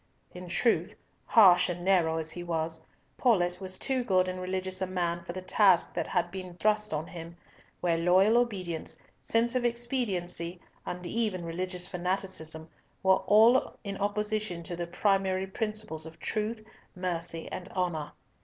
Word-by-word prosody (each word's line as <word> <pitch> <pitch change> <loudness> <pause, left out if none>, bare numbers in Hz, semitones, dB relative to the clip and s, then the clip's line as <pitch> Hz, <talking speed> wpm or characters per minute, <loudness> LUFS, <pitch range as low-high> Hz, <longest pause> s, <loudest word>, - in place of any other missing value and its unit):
In 180 0 -8
truth, 230 +6 +1 0.3
harsh 180 -5 +7
and 175 0 -4
narrow 170 -4 +3
as 160 -1 -3
he 175 - -6
was, 160 -1 -2 0.4
Paulett 180 -7 +2
was 185 -1 -2
too 260 -2 0
good 185 -5 +2
and 185 0 -4
religious 185 0 -3
a 190 - 0
man 175 -2 -1
for 170 - -6
the 185 0 -6
task 190 -1 +4
that - - -2
had 175 0 0
been 185 -2 -7
thrust 210 +1 +1
on 155 0 -2
him, 170 0 -9 0.4
where 170 -2 +1
loyal 185 +6 +4
obedience, 185 -9 -2 0.2
sense 230 +1 +1
of 255 -1 0
expediency, 205 -8 -1 0.3
and 180 0 -5
even 200 -3 -1
religious 180 +1 -2
fanaticism, 180 -3 -3 0.4
were 190 0 +5
all 225 +5 +5
in 200 -2 -4
opposition 210 -3 -1
to 175 - -4
the 175 0 -4
primary 190 +1 +1
principles 210 -5 -4
of 160 0 -13
truth, 215 +1 -3 0.3
mercy, 170 -2 -3
and 180 0 -6
honour. 175 -5 -2
185 Hz, 155 wpm, -29 LUFS, 175-210 Hz, 0.4 s, harsh